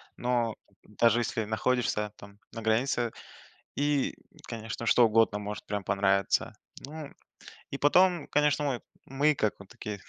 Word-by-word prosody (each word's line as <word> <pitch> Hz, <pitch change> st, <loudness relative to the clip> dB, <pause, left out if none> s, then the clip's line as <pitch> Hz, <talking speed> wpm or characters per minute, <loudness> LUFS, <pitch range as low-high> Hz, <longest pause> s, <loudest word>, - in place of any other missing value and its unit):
но 120 Hz, -2 st, 0 dB, 0.3 s
даже 115 Hz, +2 st, +2 dB
если 120 Hz, -1 st, -1 dB
находишься 110 Hz, -1 st, 0 dB
там 100 Hz, 0 st, -14 dB
на 115 Hz, -, -6 dB
границе, 115 Hz, +2 st, +1 dB, 0.6 s
и, 145 Hz, -1 st, +1 dB, 0.3 s
конечно, 115 Hz, +1 st, -6 dB
что 120 Hz, +1 st, +6 dB
угодно 110 Hz, -1 st, +3 dB
может 105 Hz, 0 st, -6 dB
прям 105 Hz, -1 st, -2 dB
понравиться. 100 Hz, 0 st, +1 dB, 0.3 s
Ну 150 Hz, +1 st, -7 dB, 0.6 s
и 140 Hz, -, -4 dB
потом, 175 Hz, +2 st, +4 dB
конечно, 150 Hz, 0 st, +2 dB
мы 135 Hz, -4 st, -1 dB, 0.3 s
мы, 145 Hz, +3 st, +2 dB
как 110 Hz, -6 st, 0 dB
вот 100 Hz, -, -13 dB
такие 105 Hz, 0 st, -7 dB
115 Hz, 135 wpm, -29 LUFS, 105-140 Hz, 0.6 s, что